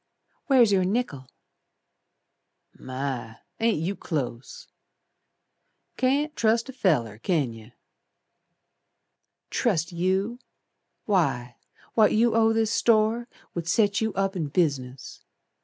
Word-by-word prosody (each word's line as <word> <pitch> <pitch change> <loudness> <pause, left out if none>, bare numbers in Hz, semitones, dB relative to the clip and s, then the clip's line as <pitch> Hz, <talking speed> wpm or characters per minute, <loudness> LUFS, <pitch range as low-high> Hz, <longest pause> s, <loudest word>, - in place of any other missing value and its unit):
"Where's 250 -7 +5
your 190 -2 +3
nickel?" 185 - -2 1.5
"My! 130 -3 -5 0.2
Ain't 225 -3 +2
you 190 +5 -2
close! 135 -9 -5 1.3
Can't 285 +4 +1
trust 230 +2 +2
a - - -7
feller, 125 - 0
can 145 -4 0
yer." 115 +1 -14 1.8
"Trust 175 -9 0
you! 190 +7 -1 0.7
Why 135 - 0 0.4
What 220 -2 +4
you 230 +2 +3
owe 225 0 +4
this 225 -1 +1
store 230 +1 +2 0.3
Would 170 -1 -4
set 205 +1 +2
you 220 0 0
up 195 0 0
in 165 -5 -2
business. 140 -5 -2
190 Hz, 105 wpm, -26 LUFS, 140-225 Hz, 1.8 s, Where's